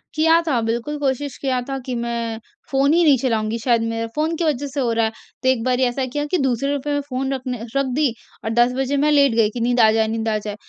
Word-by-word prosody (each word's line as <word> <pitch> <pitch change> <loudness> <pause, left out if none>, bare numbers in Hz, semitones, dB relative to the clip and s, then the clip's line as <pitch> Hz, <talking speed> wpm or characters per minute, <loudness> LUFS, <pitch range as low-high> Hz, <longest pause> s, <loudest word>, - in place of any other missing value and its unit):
किया 325 +2 +4
था, 265 -6 +2
बिल्कुल 240 +6 -2
कोशिश 275 -1 -2
किया 260 -2 -1
था 270 - -2
कि 255 - -3
मैं 235 -1 -3 0.3
फ़ोन 275 +2 +3
ही 345 +1 +4
नहीं 290 -4 +5
चलाऊँगी। 225 -3 -1
शायद 235 0 +2
मेरा 230 0 -2
फ़ोन 310 +2 0
की 335 - -2
वजह 290 -3 0
से 280 +1 -5
हो 245 -3 +1
रहा 230 0 +2
है। 220 - -1 0.3
तो 260 - +3
एक 255 -3 +1
बारी 255 +1 +1
ऐसा 255 +1 0
किया 290 +4 -3
कि 365 - +3
दूसरे 270 -1 0
रुपये 285 +1 -2
में 285 - 0
फ़ोन 265 +1 -2
रखने 255 -3 -4
रख 275 0 +2
दी, 290 -5 +2 0.3
और 220 - -2
10 240 +2 +3
बजे 270 +1 0
मैं 300 +2 +2
लेट 280 -4 +4
गई 225 -2 +3
कि 240 - -6
नींद 245 +1 +1
आ 220 -1 +6
जाए, 220 0 +2
नींद 225 0 -2
आ 215 - +1
जाए। 210 -1 -5
255 Hz, 265 wpm, -21 LUFS, 230-285 Hz, 0.3 s, आ